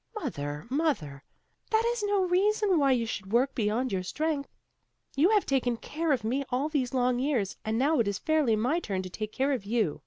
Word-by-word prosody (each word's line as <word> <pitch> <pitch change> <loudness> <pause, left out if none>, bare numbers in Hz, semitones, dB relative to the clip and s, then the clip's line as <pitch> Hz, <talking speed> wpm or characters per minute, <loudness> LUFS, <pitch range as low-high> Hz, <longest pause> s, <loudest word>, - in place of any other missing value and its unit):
"Mother, 150 - -4
mother, 215 - -1 0.5
that 440 0 +3
is 480 - -4
no 410 -2 +1
reason 385 0 +2
why 275 -2 +4
you 240 -3 +2
should 200 -3 -5
work 255 +4 +2
beyond 230 +3 0
your 190 -1 0
strength. 295 - -2 0.7
You 310 +7 +4
have 425 -2 +3
taken 250 -3 0
care 315 +6 -2
of 265 -6 +1
me 255 +6 0
all 265 +4 0
these 270 -5 -1
long 250 -1 +2
years, 255 -8 0
and 220 +1 -1
now 285 +4 +2
it 225 - +2
is 200 -1 -1
fairly 305 -7 +2
my 250 +10 +1
turn 195 - -3
to 185 - -8
take 215 +3 -5
care 270 +4 0
of 255 -7 -1
you. 210 -6 0
260 Hz, 210 wpm, -28 LUFS, 215-315 Hz, 0.7 s, why